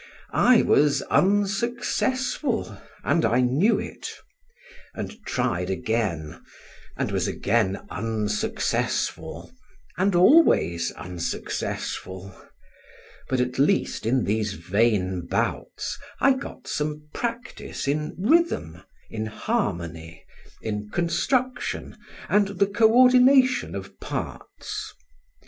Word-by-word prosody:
I 245 Hz, -1 st, +5 dB
was 145 Hz, 0 st, +3 dB
unsuccessful, 235 Hz, -, 0 dB, 0.3 s
and 155 Hz, +5 st, +2 dB
I 120 Hz, +3 st, +3 dB
knew 145 Hz, -, +3 dB
it; -, -, -6 dB, 0.9 s
and 220 Hz, 0 st, -7 dB
tried 120 Hz, -8 st, -1 dB
again, 95 Hz, -6 st, -2 dB, 0.6 s
and -, -, -1 dB
was -, -, 0 dB
again 100 Hz, -2 st, 0 dB
unsuccessful 110 Hz, 0 st, -2 dB, 0.5 s
and 190 Hz, 0 st, +2 dB
always 175 Hz, -, +5 dB
unsuccessful; 90 Hz, +2 st, -4 dB, 1.0 s
but 130 Hz, -, +1 dB
at 125 Hz, +1 st, -1 dB
least 145 Hz, -, +1 dB
in 125 Hz, 0 st, +2 dB
these 105 Hz, 0 st, 0 dB
vain 95 Hz, -1 st, 0 dB
bouts, -, -, -2 dB, 0.2 s
I 275 Hz, +1 st, +5 dB
got 260 Hz, -, -8 dB
some 150 Hz, 0 st, -3 dB
practice 235 Hz, -, -4 dB
in 150 Hz, +2 st, -1 dB
rhythm, 205 Hz, -, +1 dB, 0.3 s
in 110 Hz, 0 st, -3 dB
harmony, 85 Hz, -, -3 dB, 0.4 s
in 105 Hz, -1 st, -4 dB
construction 245 Hz, -, -1 dB, 0.3 s
and 205 Hz, -1 st, +3 dB
the 200 Hz, -, +4 dB
co 220 Hz, +2 st, +3 dB
ordination 255 Hz, +1 st, +5 dB
of -, -, -8 dB
parts. -, -, -6 dB
140 Hz, 95 wpm, -25 LUFS, -, 1.0 s, I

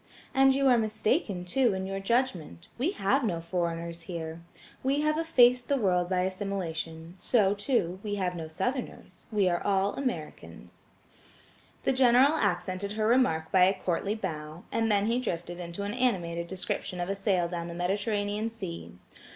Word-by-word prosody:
And 270 Hz, -1 st, +5 dB
you 275 Hz, 0 st, +3 dB
are 245 Hz, -2 st, +5 dB
mistaken, 215 Hz, -, 0 dB
too, 235 Hz, +3 st, +2 dB
in 190 Hz, 0 st, -3 dB
your 195 Hz, 0 st, -3 dB
judgment: 195 Hz, -, -1 dB
we 320 Hz, +10 st, +1 dB
have 265 Hz, -, +1 dB
no 175 Hz, -7 st, 0 dB
foreigners 170 Hz, -1 st, -3 dB
here. 165 Hz, -1 st, -6 dB, 0.4 s
We 275 Hz, +2 st, +1 dB
have 305 Hz, 0 st, +2 dB
effaced 250 Hz, -7 st, +4 dB
the 280 Hz, -, +3 dB
word 180 Hz, -6 st, +1 dB
by 185 Hz, -1 st, +1 dB
assimilation; 180 Hz, -3 st, -4 dB
so, 205 Hz, -3 st, +3 dB
too, 200 Hz, -4 st, -1 dB
we 205 Hz, -1 st, -3 dB
have 185 Hz, -3 st, -1 dB
no 165 Hz, -2 st, -5 dB
Southerners–we 215 Hz, -, -3 dB
are 175 Hz, -1 st, +1 dB, 0.3 s
Americans." 235 Hz, -, -6 dB, 0.9 s
The -, -, +2 dB
General 260 Hz, +2 st, +5 dB
accented 195 Hz, -, -1 dB
her 215 Hz, 0 st, -1 dB
remark 215 Hz, -10 st, +2 dB
by 185 Hz, -1 st, +6 dB
a 190 Hz, +1 st, +1 dB
courtly 195 Hz, +4 st, -1 dB
bow, 160 Hz, -5 st, -5 dB
and 225 Hz, -1 st, +1 dB
then 200 Hz, 0 st, +3 dB
he 235 Hz, +3 st, +1 dB
drifted 175 Hz, -6 st, -4 dB
into 170 Hz, +3 st, -5 dB
an 205 Hz, +1 st, -3 dB
animated 175 Hz, -9 st, 0 dB
description 185 Hz, 0 st, -4 dB
of 175 Hz, -, -2 dB
a 195 Hz, -, -1 dB
sail 195 Hz, -3 st, +1 dB
down 170 Hz, -1 st, -4 dB
the 170 Hz, -, -7 dB
Mediterranean 205 Hz, +4 st, -1 dB
Sea. 85 Hz, -, -7 dB
195 Hz, 160 wpm, -29 LUFS, 175-235 Hz, 0.9 s, by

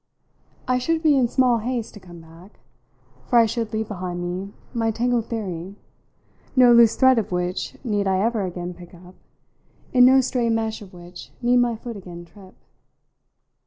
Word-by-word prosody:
I 250 Hz, 0 st, +1 dB
should 325 Hz, +5 st, -1 dB
be 305 Hz, -2 st, +4 dB
in 255 Hz, -3 st, +3 dB
small 250 Hz, -1 st, +2 dB
haste 235 Hz, 0 st, -4 dB
to 210 Hz, -, -11 dB
come 175 Hz, -3 st, -13 dB
back, 165 Hz, +5 st, -17 dB, 0.7 s
for 245 Hz, -, +2 dB
I 230 Hz, -, +6 dB
should 225 Hz, 0 st, -3 dB
leave 220 Hz, 0 st, -3 dB
behind 180 Hz, -4 st, -5 dB
me 180 Hz, +3 st, -5 dB, 0.2 s
my 225 Hz, -2 st, 0 dB
tangled 235 Hz, +1 st, -1 dB
theory, 190 Hz, -4 st, -5 dB, 0.8 s
no 250 Hz, -2 st, +6 dB
loose 235 Hz, -1 st, +6 dB
thread 260 Hz, -2 st, +4 dB
of 215 Hz, -, -5 dB
which 180 Hz, +8 st, -3 dB
need 205 Hz, -3 st, -1 dB
I 190 Hz, -1 st, +1 dB
ever 225 Hz, +1 st, 0 dB
again 180 Hz, -1 st, -5 dB
pick 175 Hz, 0 st, -14 dB
up, 180 Hz, +1 st, -15 dB, 0.8 s
in 250 Hz, -1 st, +6 dB
no 260 Hz, +1 st, +7 dB
stray 250 Hz, -2 st, 0 dB
mesh 225 Hz, -1 st, -2 dB
of 195 Hz, -3 st, -12 dB
which 175 Hz, -1 st, -12 dB
need 245 Hz, +1 st, +3 dB
my 240 Hz, -1 st, +2 dB
foot 230 Hz, 0 st, -8 dB
again 175 Hz, -3 st, -10 dB
trip. 185 Hz, +2 st, -17 dB
220 Hz, 175 wpm, -22 LUFS, 180-240 Hz, 0.8 s, no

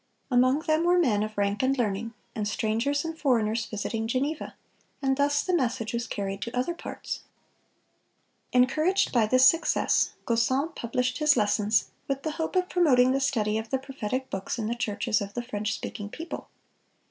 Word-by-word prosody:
Among 255 Hz, +4 st, +4 dB
them 315 Hz, 0 st, +1 dB
were 350 Hz, +1 st, +4 dB
men 240 Hz, -12 st, +3 dB
of 215 Hz, 0 st, -4 dB
rank 200 Hz, 0 st, 0 dB
and 265 Hz, +1 st, +2 dB
learning, 225 Hz, 0 st, -2 dB, 0.2 s
and 210 Hz, -1 st, -2 dB
strangers 230 Hz, +8 st, 0 dB
and 325 Hz, 0 st, -4 dB
foreigners 230 Hz, -7 st, +1 dB
visiting 220 Hz, +1 st, -3 dB
Geneva; 280 Hz, +6 st, -2 dB, 0.4 s
and 270 Hz, -1 st, +1 dB
thus 285 Hz, +1 st, +2 dB
the 370 Hz, -, -1 dB
message 235 Hz, -6 st, -1 dB
was 235 Hz, 0 st, -2 dB
carried 195 Hz, -1 st, -4 dB
to 235 Hz, +3 st, -4 dB
other 255 Hz, +8 st, 0 dB
parts. 340 Hz, -, -6 dB, 1.3 s
Encouraged 310 Hz, +10 st, +3 dB
by 230 Hz, -4 st, +3 dB
this 255 Hz, +3 st, +5 dB
success, 330 Hz, +4 st, +2 dB
Gaussen 260 Hz, +7 st, +1 dB
published 250 Hz, +3 st, -2 dB
his 300 Hz, -3 st, +4 dB
lessons, 210 Hz, 0 st, +2 dB, 0.2 s
with 275 Hz, 0 st, -2 dB
the 315 Hz, -, -1 dB
hope 320 Hz, -, -3 dB
of 365 Hz, 0 st, +2 dB
promoting 260 Hz, -9 st, +4 dB
the 270 Hz, -, +1 dB
study 220 Hz, -6 st, +1 dB
of 220 Hz, 0 st, -7 dB
the 265 Hz, -, +1 dB
prophetic 260 Hz, -1 st, -4 dB
books 195 Hz, +4 st, -3 dB
in 225 Hz, -, -2 dB
the 225 Hz, -, -1 dB
churches 220 Hz, -1 st, -1 dB
of 200 Hz, 0 st, -6 dB
the 240 Hz, -, -2 dB
French 215 Hz, -3 st, -3 dB
speaking 205 Hz, -2 st, -6 dB
people. 330 Hz, +9 st, -7 dB
250 Hz, 175 wpm, -27 LUFS, 215-285 Hz, 1.3 s, this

